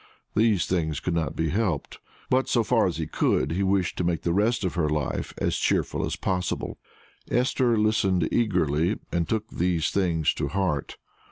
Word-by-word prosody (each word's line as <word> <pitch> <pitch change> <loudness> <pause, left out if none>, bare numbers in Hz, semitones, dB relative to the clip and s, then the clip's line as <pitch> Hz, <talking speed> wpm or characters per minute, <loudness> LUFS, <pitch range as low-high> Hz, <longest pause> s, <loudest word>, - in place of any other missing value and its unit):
These 105 -5 +3
things 80 -5 -1
could 90 - -2
not 80 -4 -1
be 80 0 0
helped, 90 -5 -1 0.3
but 130 +1 +2
so 120 - +3
far 115 -2 +3
as 90 - -3
he 80 - -2
could, 80 - +1
he 90 +4 -1
wished 95 -2 +1
to - - +1
make 85 -1 -1
the 85 - +1
rest 110 +4 +1
of 90 - -1
her 80 -4 0
life 75 -3 -2
as - - 0
cheerful - - 0
as - - -2
possible. 90 -1 -2 0.5
Esther 125 -1 +2
listened 100 -5 +2
eagerly, 90 -5 +1
and 85 -1 -1
took 110 -1 -1
these 85 -2 0
things 85 -5 +1
to 75 - -2
heart. 85 -4 -2
90 Hz, 180 wpm, -26 LUFS, 80-105 Hz, 0.5 s, These